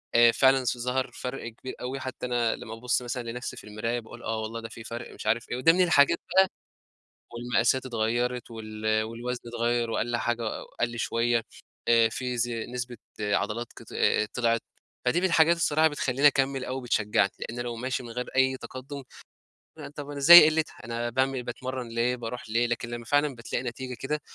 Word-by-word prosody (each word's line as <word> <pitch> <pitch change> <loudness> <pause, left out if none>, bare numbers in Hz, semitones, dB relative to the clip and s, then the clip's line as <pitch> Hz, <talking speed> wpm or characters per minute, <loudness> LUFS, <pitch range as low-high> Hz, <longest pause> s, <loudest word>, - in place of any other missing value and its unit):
آآ، 120 0 +7
فعلًا 130 0 +4
س 120 - 0
ظهر 125 +2 -1
فرق 125 -1 -6
كبير 130 +3 -8
أوي، 130 +2 -4
حتى 130 -1 -5
أنا 120 -2 +1
لمّا 110 - -8
بابص 120 +1 0
مثلًا 120 -1 -4
لنَفسي 125 +1 -6
في - - -10
المرايا 110 +3 -3
باقول 120 +1 -12
آه 110 -1 -2
والله 115 +1 -4
ده 115 - -7
في 115 - -10
فرق 120 +2 -7
مش - - -10
عارف 115 +2 +1
إيه، 120 - -1
وده 165 +6 +5
من 185 - +4
الحاجات 170 -2 +5 0.2
بقى 190 0 +7 0.9
والمقاسات 120 +2 +1
اتغيرت 120 +1 -1
وال 110 -1 -1
والوزن 120 +2 -5
اتغير 120 0 0
وقَلّ 120 +1 0
حاجة 120 +1 -1 0.4
قَلّ 120 0 -1
شوية 115 0 +1 0.4
آآ، 115 -1 +5
في 125 0 -3
ز 120 +1 +1
نسبة 120 +1 -4 0.2
عضلات 105 +3 -1
كط - - -12 0.5
طلعِت، 115 -2 +1 0.4
فدي 170 - +3
من - - +2
الحاجات 165 -1 +5
الصراحة 160 -1 +3
بتخلّيني 140 -1 +2
أكمّل 135 -2 +1
أو 130 +1 -4
بتشجعني، 105 -4 +1
لأن 120 +2 -5
لو 120 -1 -3
ماشي 125 +2 -3
من 120 - -9
غير 125 +2 -4
أي 130 0 +3
تقدم، 135 +2 -8 0.9
طب 145 -1 -7
أنا 145 - -5
زي 170 +3 +11
قِلتها 155 0 +1
أنا 120 +1 -2
باعمل 130 +1 0
باتمرن 125 0 -5
ليه، 115 +2 0
باروح 120 -1 -6
ليه! 120 +2 +2
لكن 120 0 -3
لمّا 120 0 -6
فعلًا 145 +2 +2
بتلاقي 120 +1 -4
نتيجة 125 +1 -5
كده 150 +4 -2
120 Hz, 185 wpm, -27 LUFS, 115-130 Hz, 0.9 s, زي